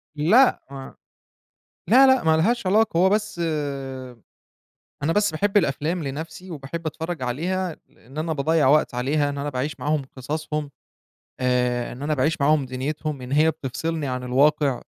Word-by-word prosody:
لأ 210 - +4
ما 135 -1 -9 0.9
لا، 265 +5 +7
لأ، 260 -7 +4
ما 160 0 +4
لهاش 225 +5 +1
علاقة 210 -2 +2
هو 185 - +5
بس 210 -1 -1 1.6
أنا 160 +3 +1
بس 205 -4 +3
باحب 200 +6 -1
الأفلام 160 0 +1
لنفْسي 160 +6 -7
وباحب 160 +2 -6
أتفرّج 160 -1 -4
عليها 170 +7 -2
لإن 135 +6 -14
أنا 160 +1 -1
باضيّع 155 -1 +2
وقت 150 -2 +3
عليها 145 +4 0
إن 140 - -5
أنا 145 +1 -3
باعيش 130 +3 -4
معاهم 150 0 0
قصصهم، 150 +2 -4 0.7
آآ 125 -1 0
إن 125 - -9
أنا 155 +1 0
باعيش 150 +3 0
معاهم 140 -1 +3
دنيتهم، 140 +2 -4
إن 125 - -7
هي 155 +3 +4
بتفصلني 155 +1 -4
عن 125 -1 -3
الواقع، 140 +1 +2
155 Hz, 150 wpm, -23 LUFS, 135-170 Hz, 1.6 s, لا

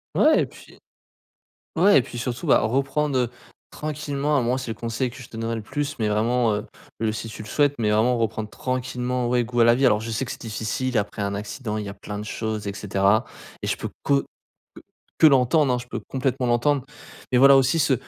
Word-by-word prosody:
Ouais - - +5
et - - -2
puis - - -16 1.0
ouais 185 -1 +6
et - - +2
puis 120 - -9
surtout 120 +6 -4
bah, - - +6
reprendre, 135 +5 0
heu, 120 - 0 0.4
tranquillement 150 -1 -2
à - - +2
moi, 125 +2 0
c'est 130 -3 -4
le - - -5
conseil 115 +2 -2
que 130 - -13
je 120 - -12
te 115 - -9
donnerai 115 0 -2
le 115 - -4
plus 145 +5 -4
mais 105 -1 +1
vraiment, 115 +2 +2
heu, 105 - -4 0.3
le 110 -1 0
si 110 - -5
tu 110 -1 -8
le - - -11
souhaites 145 +4 +2
mais 110 -3 +1
vraiment 115 +4 +3
reprendre 110 -1 -2
tranquillement, 125 0 -2
ouais, 120 0 +2
goût 120 +1 -3
à - - +7
la 115 0 +6
vie. 135 +2 +2
Alors 105 -4 +4
je 115 - -5
sais 115 +4 -2
que - - -6
c'est - - -8
difficile 115 +2 -2
après 105 0 -2
un 100 0 -1
accident, 105 +2 -4
il 105 - -4
y - - -5
a 100 - -6
plein 105 0 -7
de 105 - -5
choses 110 -1 -4
et 100 - -3
cetera 100 +1 +2 0.4
et - - -3
je - - 0
peux - - -5
que 140 -1 +2 0.5
que - - -12 0.4
que 160 - +8
l'entendre 135 +1 +4
hein? - - +1
Je 120 - -8
peux - - -4
complètement 130 -1 -1
l'entendre. 125 +3 +2 0.5
Mais 125 - +4
voilà 140 +1 +8
aussi 135 +4 +3
se 140 -2 +3
120 Hz, 240 wpm, -24 LUFS, 110-135 Hz, 1.0 s, que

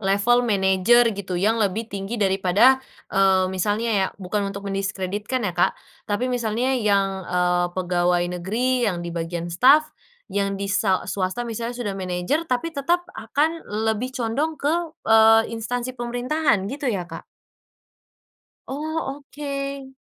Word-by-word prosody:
level 200 +5 +3
manajer 200 +4 +4
gitu 190 -3 -4
yang 220 +4 +2
lebih 215 +3 0
tinggi 200 +2 -5
daripada, 195 +6 +4 0.3
eee, 190 -1 +4
misalnya 210 +5 0
ya 195 -1 +2
bukan 195 +1 -2
untuk 200 0 -7
mendiskreditkan 200 +4 -2
ya 180 - -3
Kak, 175 - +1 0.3
tapi 220 +5 0
misalnya 245 +1 0
yang, 195 -4 +1
eee, 180 0 +1
pegawai 175 -1 +1 0.2
negeri 245 +7 0
yang 175 - -4
di 170 0 -6
bagian 170 0 -3
staf, 265 - +4 0.4
yang 200 0 0
di 200 - -3
sa 195 -2 +1
swasta 190 +4 -2
misalnya 235 +1 -4
sudah 215 -5 -3
manajer 185 - -1
tapi 255 +4 -1
tetep 330 +4 0
akan 320 +3 -1 0.2
lebih 220 +4 -1
condong 280 +6 -1
ke, 295 +3 +1 0.3
eee, 225 0 +7
instansi 245 +3 -3
pemerintahan 245 -1 0
gitu 275 +3 -2
ya 180 -5 -3
Kak? - - -8 1.5
Oh 295 0 -3
oke. 275 -1 -6
215 Hz, 140 wpm, -23 LUFS, 190-255 Hz, 1.5 s, eee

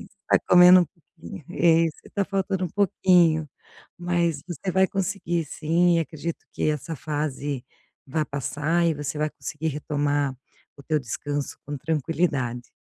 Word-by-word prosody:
mas - - -13 0.2
tá - - +5
comendo 180 +1 +9
um 175 - -4
pouquinho 165 -1 -13
é, 165 -2 +4
isso, 155 - -5 0.2
tá 200 -1 +1
faltando 190 -1 -1
um - - -7
pouquinho. 175 -5 +3 0.5
Mas 170 -4 0
você 180 +1 -4
vai 190 +1 +4
conseguir 185 -3 -2
sim, 170 +3 +2
acredito 165 +1 -5
que - - -1
essa 155 +2 -4
fase 145 -2 -3 0.4
vai 155 +3 -1
passar 150 +5 -1
e 165 - +2
você 145 0 -4
vai 155 0 0
conseguir 155 +2 -5
retomar 145 -2 -1 0.4
o 140 - -13
teu 155 +2 0
descanso 145 +3 -4
com 145 +1 -4
tranquilidade. 145 -5 -1
160 Hz, 150 wpm, -25 LUFS, 145-175 Hz, 0.5 s, comendo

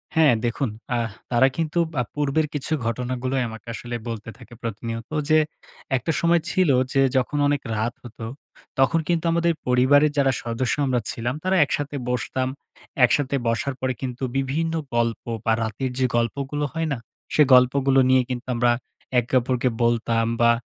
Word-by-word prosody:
হ্যাঁ। 155 -5 +6
দেখুন, 120 +2 -1 0.3
আহ 115 -1 0 0.2
তারা 125 +3 +5
কিন্তু 165 +1 0
বা 130 - 0
পূর্বের 150 +1 +1
কিছু 150 +2 -2
ঘটনাগুলোই 125 +2 -1
আমাকে 110 +1 -11
আসলে 120 +1 -5
বলতে 115 -1 -5
থাকে 120 -1 -14
প্রতিনিয়ত। 115 +1 -5 0.2
যে, 155 - +6 0.6
একটা 130 +7 -2
সময় 170 -1 +3
ছিল, 185 -4 +2 0.2
যে, 135 - +4 0.2
যখন 140 +3 0
অনেক 145 -1 +1
রাত 110 +3 -1
হতো, 115 -2 -8 0.5
তখন 165 +5 +4
কিন্তু 170 -1 0
আমাদের 170 0 +2
পরিবারের 140 +4 +4
যারা 135 -1 +4
সদস্য 120 +1 -1
আমরা 125 -2 +1
ছিলাম, 120 +2 -2
তারা 185 +1 +2
একসাথে 145 0 -3
বসতাম। 130 +1 -1 0.6
একসাথে 140 +2 +1
বসার 130 +4 0
পরে 130 0 0
কিন্তু 130 0 -4
বিভিন্ন 155 +5 -1 0.2
গল্প, 115 -1 0 0.2
বা 115 - +3
রাতের 115 +4 -3
যে, 130 - +3
গল্পগুলো 140 +5 -1
হয় 165 0 -1
না। - - -3 0.4
সে 150 - +4
গল্পগুলো 135 +2 +5
নিয়ে 130 0 +5
কিন্তু 125 +1 -4
আমরা 120 0 +3 0.5
একে 120 +1 -6
অপরকে 125 0 0
বলতাম। 115 -1 +2 0.2
বা 115 - +6
130 Hz, 160 wpm, -23 LUFS, 120-145 Hz, 0.6 s, হ্যাঁ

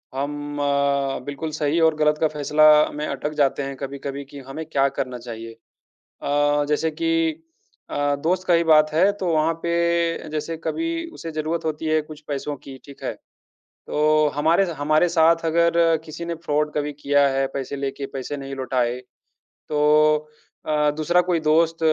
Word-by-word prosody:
हम 145 +1 -4
अ, 140 -1 +1
बिल्कुल 145 +3 -5
सही 150 +1 0
और 160 -1 +4
गलत 150 0 +2
का 160 - +4
फैसला 150 0 +2 0.3
में 150 +1 -3
अटक 145 +2 -3
जाते 140 0 +1
हैं 135 0 -5
कभी-कभी 140 0 -5
कि 140 +1 -11
हमें 160 +4 -6
क्या 140 -3 +1
करना 125 -2 -3
चाहिए? 115 -1 -8 0.7
अ, 145 0 +2
जैसे 155 +2 +1
कि 165 -1 0 0.5
अ, 145 0 0
दोस्त 185 +2 0
का 175 - +5
ही 170 0 +3
बात 155 -1 +5
है, 165 +6 +4
तो 200 -2 -5
वहाँ 155 +1 +2
पे 170 0 0
जैसे 155 +2 -3
कभी 330 0 -2
उसे 165 - -7
ज़रूरत 155 +2 -2
होती 160 0 -3
है 155 0 +2
कुछ 150 0 -12
पैसों 145 0 -3
की, 135 0 -11
ठीक 140 -1 -14
है? - - -1 0.7
तो 155 0 +3
हमारे 160 +6 +3
ज - - -4
हमारे 155 +4 +3
साथ 165 0 +3
अगर 170 0 +3
किसी 160 +2 -7
ने 170 - -3
फ्रॉड 150 -1 0
कभी 150 0 -1
किया 145 0 +4
है, 135 0 0
पैसे 135 +1 -4
लेके 140 0 -4
पैसे 135 +2 -4
नहीं 135 -1 -6
लौटाए, 125 -2 -1 0.7
तो 150 0 +3 0.4
अ, 150 -1 +2
दूसरा 175 +3 +3
कोई 175 -2 0
दोस्त 160 +1 +2
150 Hz, 170 wpm, -23 LUFS, 140-165 Hz, 0.7 s, का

